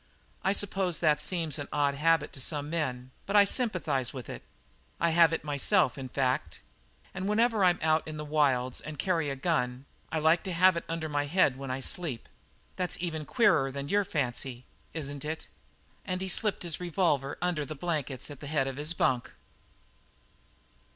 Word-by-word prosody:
"I 190 - +3
suppose 195 -3 0
that 150 -3 +3
seems 160 -3 -1
an 145 - -4
odd 145 -1 +2
habit 160 +1 +2
to 135 - -5
some 145 +2 -3
men, 130 -6 -2 0.2
but 200 - -1
I 205 -1 +8
sympathize 180 - 0
with 125 -3 -7
it. - - -7 0.6
I 170 - +3
have 165 -1 +6
it 165 - -2
myself, 150 - +2
in 130 -2 -6
fact. 125 - -1 0.5
And 190 +2 -3
whenever 225 -1 +3
I'm 180 -1 +5
out 155 0 +2
in 155 -1 -5
the 150 - -5
wilds 135 -4 +1
and 155 0 -7
carry 165 -3 0
a 135 - -2
gun 130 -4 -1 0.3
I 160 - 0
like 160 +2 +4
to 185 - -2
have 185 +1 +5
it 170 - -3
under 165 -1 -2
my 145 -1 -1
head 155 -4 +3
when 135 0 -7
I 130 +1 -2
sleep. 140 -5 -4 0.5
That's 180 -1 -1
even 160 -3 -3
queerer 155 - +3
than 140 +1 -5
your 205 0 +3
fancy, 130 -6 -3 0.3
isn't 145 -3 -5
it?" 155 +1 -4 0.6
And 185 -2 -2
he 190 0 -3
slipped 210 +2 0
his 170 -2 -3
revolver 165 -6 0
under 175 -4 0
the 155 +2 -6
blankets 150 -4 -3
at 145 - -9
the 145 - -7
head 145 -2 +1
of 135 0 -4
his 150 +4 -1
bunk. 130 -7 +1
155 Hz, 185 wpm, -29 LUFS, 140-175 Hz, 0.6 s, I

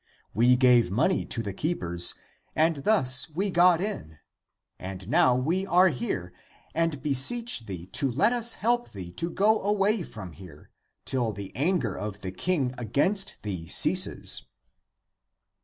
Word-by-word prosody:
We 120 +3 +4
gave 125 -5 +4
money 130 - 0
to 115 - -2
the 100 -2 -5
keepers 90 - 0 0.4
and 160 0 +2
thus 135 - +2
we 190 +6 -2
got 175 -1 +4
in, 180 - -5 0.6
and 95 0 -8
now 125 +2 +3
we 160 +9 -1
are 185 0 +4
here 115 - -4 0.4
and 165 -4 -1
beseech 145 - +2
thee 90 -4 -7
to 135 +8 -2
let 145 - +2
us 235 -1 +1
help 240 +2 -1
thee 90 -4 -8
to 165 - -4
go 215 +5 +2
away 205 +1 +1
from 110 - -9
here, 90 +3 -15 0.3
till 120 -5 -2
the 100 -1 -9
anger 175 +7 -1
of 105 -1 -6
the 95 - -5
king 135 - -1
against 145 - -1
thee 90 -6 -5
ceases." - - +3
130 Hz, 145 wpm, -26 LUFS, -, 0.6 s, We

